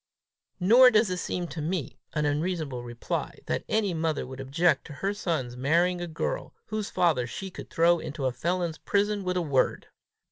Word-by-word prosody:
"Nor 235 +8 +8
does 215 -4 +3
it 180 - -1
seem 180 0 -2
to 160 - -5
me 160 -3 -3
an 150 0 0
unreasonable 150 -3 -1
reply, 120 -1 -4
that - - -1
any 210 -4 +1
mother 160 -2 -1
would 130 +1 -9
object 140 +3 +2
to 150 - -9
her 195 +7 -2
son's 155 -11 -2
marrying 170 +7 +2
a 175 - -3
girl 170 - -3
whose 215 -1 -2
father 155 -9 +2
she 190 +9 -6
could - - -9
throw 170 +1 +4
into 145 -3 -4
a 130 - +2
felon's 170 +5 -2
prison 205 0 +1
with 180 0 -1
a 180 - +1
word!" 140 -4 +1
170 Hz, 185 wpm, -27 LUFS, 145-185 Hz, -, Nor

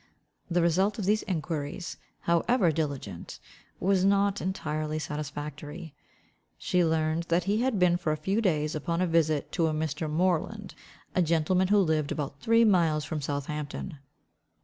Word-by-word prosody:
The 175 -1 +2
result 190 +5 +2
of 205 - -3
these 210 +2 +2
enquiries, 160 -1 -3 0.2
however 170 +3 +2
diligent, 140 - -4 0.4
was 190 0 +2
not 200 0 +2
entirely 155 -4 -2
satisfactory. 150 +1 -6 0.6
She 180 -1 +1
learned 160 0 +1
that 170 +1 +1
he 205 +5 +1
had 255 -3 +1
been 180 -2 +4
for 170 -3 -1
a 155 - -1
few 195 +8 0
days 155 -7 +1
upon 170 +3 -2
a - - +3
visit 160 -3 +1
to 165 -3 +1
a 155 - 0
Mr. 155 0 -2
Moreland, 185 +5 0 0.4
a 185 - +2
gentleman 170 +3 +2
who 205 +2 +4
lived 160 -6 +2
about 140 -2 -4
three 230 +6 +4
miles 165 -7 +3
from 155 +2 -3
Southampton. 145 +3 -4
165 Hz, 150 wpm, -28 LUFS, 150-185 Hz, 0.6 s, been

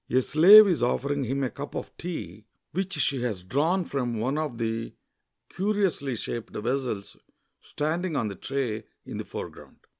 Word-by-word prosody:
A 130 - +4
slave 195 - +9
is 175 -9 +1
offering 140 +3 0
him 135 +3 -1
a 130 - -1
cup 145 +1 -7
of - - -6
tea 110 - -6 0.3
which 190 +2 -2
she 135 -2 +1
has 105 -7 -2
drawn 160 - +1
from 125 -4 -2
one 125 +6 -1
of 150 -6 -2
the 115 0 -3 0.6
curi 205 +2 +1
ously 140 -8 -2
shaped 115 +1 -5
vessels 120 -3 -2 0.4
standing 160 +3 -2
on 115 - 0
the 100 - -4
tray 115 -1 -3 0.2
in - - -6
the - - -4
foreground. - - -8
135 Hz, 170 wpm, -27 LUFS, 115-160 Hz, 0.6 s, slave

